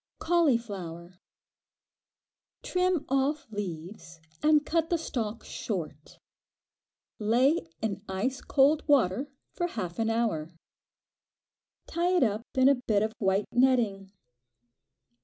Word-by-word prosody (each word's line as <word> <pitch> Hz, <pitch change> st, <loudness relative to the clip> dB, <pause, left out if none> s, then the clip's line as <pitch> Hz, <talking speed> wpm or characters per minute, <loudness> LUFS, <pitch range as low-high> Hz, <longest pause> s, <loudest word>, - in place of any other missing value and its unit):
Cauliflower. 200 Hz, -, -1 dB, 1.4 s
Trim 365 Hz, -3 st, 0 dB
off 275 Hz, +2 st, 0 dB
leaves 175 Hz, -3 st, -7 dB, 0.2 s
and 300 Hz, -1 st, +4 dB
cut 325 Hz, -1 st, 0 dB
the 345 Hz, -, +2 dB
stalk 235 Hz, -8 st, -4 dB
short. 155 Hz, -8 st, -6 dB, 1.0 s
Lay 240 Hz, -, +2 dB, 0.2 s
in 200 Hz, -3 st, -2 dB
ice 245 Hz, +8 st, -2 dB
cold 290 Hz, +3 st, +3 dB
water 265 Hz, -, +3 dB, 0.3 s
for 350 Hz, -, -1 dB
half 185 Hz, -, -5 dB
an 225 Hz, 0 st, +1 dB
hour. 225 Hz, -9 st, 0 dB, 1.4 s
Tie 350 Hz, +2 st, 0 dB
it 355 Hz, -, +4 dB
up 215 Hz, -2 st, 0 dB
in 260 Hz, 0 st, +5 dB
a 280 Hz, -, +7 dB
bit 210 Hz, -2 st, +3 dB
of 220 Hz, 0 st, -2 dB
white 195 Hz, 0 st, +1 dB
netting. 230 Hz, -7 st, +2 dB
230 Hz, 105 wpm, -28 LUFS, 195-285 Hz, 1.4 s, a